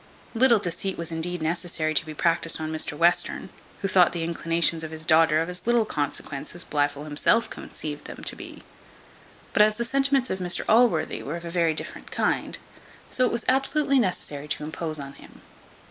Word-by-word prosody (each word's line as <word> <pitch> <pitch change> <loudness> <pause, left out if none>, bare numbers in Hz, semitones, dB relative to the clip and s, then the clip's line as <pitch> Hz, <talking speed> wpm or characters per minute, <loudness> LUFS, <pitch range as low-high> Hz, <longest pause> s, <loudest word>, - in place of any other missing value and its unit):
Little 235 0 +5
deceit 190 0 -2
was 170 0 -4
indeed 165 +1 -2
necessary 165 -1 -1
to 155 - +1
be 155 - -7
practised 165 +1 +1
on 155 0 -4
Mr 155 -1 -2
Western; 170 +2 +1 0.3
who - - +2
thought 185 -3 +4
the 170 -2 -3
inclinations 165 0 +1
of 160 - -5
his 160 0 -6
daughter 160 -1 +4
of 165 - -1
as 180 +3 -6
little 240 -2 +3
consequence 145 -3 -4
as 175 - 0
Blifil 145 -1 -1
himself 155 +10 +1
conceived 150 -1 -7
them - - -9
to - - +1
be; - - -11 0.9
but - - +4
as 215 0 +5
the 235 - -2
sentiments 270 +1 +1
of 190 - -2
Mr 180 -1 0
Allworthy 220 -8 +3
were 150 +5 -4
of 170 - -9
a 170 - -5
very 165 -2 +1
different - - -4
kind, - - -1 0.5
so 255 - +3
it - - -2
was 235 - -1
absolutely 270 +1 +2
necessary 150 - -2
to 150 - -2
impose 155 +1 -3
on 140 -1 -7
him. - - -16
170 Hz, 190 wpm, -25 LUFS, 155-210 Hz, 0.9 s, Little